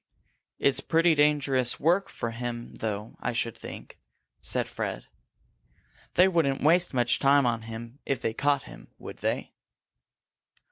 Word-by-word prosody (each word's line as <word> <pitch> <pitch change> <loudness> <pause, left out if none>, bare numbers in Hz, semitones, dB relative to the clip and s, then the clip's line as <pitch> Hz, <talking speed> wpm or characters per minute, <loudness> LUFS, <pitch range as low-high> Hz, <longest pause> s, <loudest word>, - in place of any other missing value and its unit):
"It's 135 -1 +3
pretty 165 +3 +3
dangerous 145 -4 +2
work 180 +6 +2
for 115 - -4
him, 120 0 -5
though, 105 0 -4
I 125 - -2
should 115 -1 -1
think," - - -10 0.4
said - - -1
Fred. - - -4 1.1
"They 180 - +6
wouldn't 155 -8 +1
waste 175 +4 +4
much 120 -2 +2
time 140 0 +4
on 115 -2 0
him 115 +4 -8
if 135 -3 -1
they 110 - -2
caught 145 +2 +1
him, - - -13
would - - -9
they?" - - -2
135 Hz, 140 wpm, -27 LUFS, 120-150 Hz, 1.1 s, They